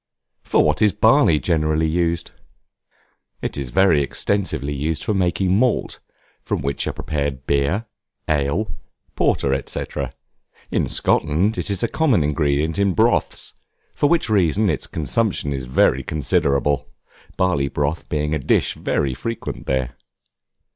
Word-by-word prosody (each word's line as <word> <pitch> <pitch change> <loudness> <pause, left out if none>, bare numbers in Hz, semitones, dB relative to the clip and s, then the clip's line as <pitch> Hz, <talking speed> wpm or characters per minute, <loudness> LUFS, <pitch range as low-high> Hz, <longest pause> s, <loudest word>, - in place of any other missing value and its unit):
For - - +2
what 75 0 +1
is 105 -2 +4
Barley 110 - +4
generally 75 +2 +1
used? 85 +1 -1 1.1
It - - -3
is 70 -3 -4
very 85 +1 +4
extensively 75 -1 -1
used 75 +3 -2
for 110 - 0
making 95 0 +1
malt, 125 +3 +1 0.4
from - - -3
which 70 0 -2
are - - 0
prepared 70 -3 -3
beer, 70 +11 +1 0.4
ale, 75 +7 0 0.4
porter, 65 -1 +1
&c. - - -5 0.9
in - - 0
Scotland 85 +9 +1
it - - -3
is 100 0 -1
a - - +3
common 125 - +2
ingredient 75 +3 0
in 100 -2 +2
broths, 115 +2 +1 0.4
for 145 - +1
which 170 0 +2
reason 100 -1 +2
its - - -3
consumption 80 -2 -1
is 65 -2 -4
very 65 +1 +3
considerable, 70 0 0 0.5
barley 90 -7 +1
broth 75 +3 -2
being 75 -1 -1
a 80 - 0
dish 65 - +1
very 70 -2 -1
frequent 115 - -5
there. 65 -2 -1
80 Hz, 135 wpm, -21 LUFS, 70-100 Hz, 1.1 s, is